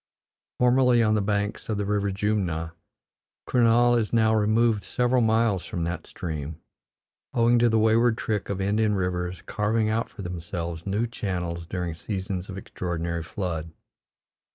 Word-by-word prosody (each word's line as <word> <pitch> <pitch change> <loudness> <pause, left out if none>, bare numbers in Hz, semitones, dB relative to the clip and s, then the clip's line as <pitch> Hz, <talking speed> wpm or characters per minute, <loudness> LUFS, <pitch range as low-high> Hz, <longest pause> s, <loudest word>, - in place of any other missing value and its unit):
Formerly 125 -1 +4
on 110 -1 +3
the 105 - +2
banks 100 +1 -2
of 110 - 0
the 100 - -1
river 100 0 0
Jumna, 95 -5 -1 0.7
Kurnaul 120 0 +4
is 110 - -2
now 110 -1 +3
removed 110 0 +2
several 125 0 +1
miles 110 -4 +2
from 85 - -4
that 85 +2 -4
stream, 80 -1 -5 0.8
owing 120 0 +4
to 120 0 +4
the 110 - +2
wayward 110 +1 +3
trick 105 -2 -2
of 100 -1 -2
Indian 105 +2 +1
rivers 90 -2 -2
carving 110 +1 0
out 115 +1 -1
for 100 - -9
themselves 85 -1 -5
new 105 +4 +1
channels 90 -7 -4
during 90 -1 -3
seasons 95 +2 -4
of 95 - -6
extraordinary 85 -3 -3
flood. 85 -2 -4
100 Hz, 150 wpm, -26 LUFS, 90-115 Hz, 0.8 s, Formerly